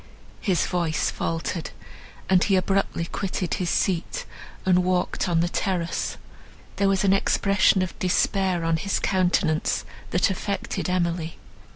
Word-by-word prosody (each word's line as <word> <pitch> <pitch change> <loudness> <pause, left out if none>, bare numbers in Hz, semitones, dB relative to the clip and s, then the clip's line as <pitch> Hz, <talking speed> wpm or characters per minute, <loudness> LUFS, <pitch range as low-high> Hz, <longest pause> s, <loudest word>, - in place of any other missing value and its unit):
His 185 -5 +1
voice 170 -3 0
faltered, 165 0 -3 0.6
and 185 -1 +4
he 195 - +3
abruptly 190 -2 0
quitted 185 -1 -3
his 180 -3 -1
seat 190 - 0 0.4
and 180 -1 +4
walked 180 0 0
on 165 -1 +3
the 170 - +1
terrace. 175 -2 -2 0.6
There 200 -1 +3
was 195 0 +2
an 195 -1 +4
expression 195 -1 +3
of 185 - -6
despair 185 -1 +1
on 165 0 +2
his 195 +4 -1
countenance, 180 -4 +1 0.2
that 180 +3 +2
affected 195 0 -3
Emily. 170 -2 -1
180 Hz, 135 wpm, -25 LUFS, 170-195 Hz, 0.6 s, and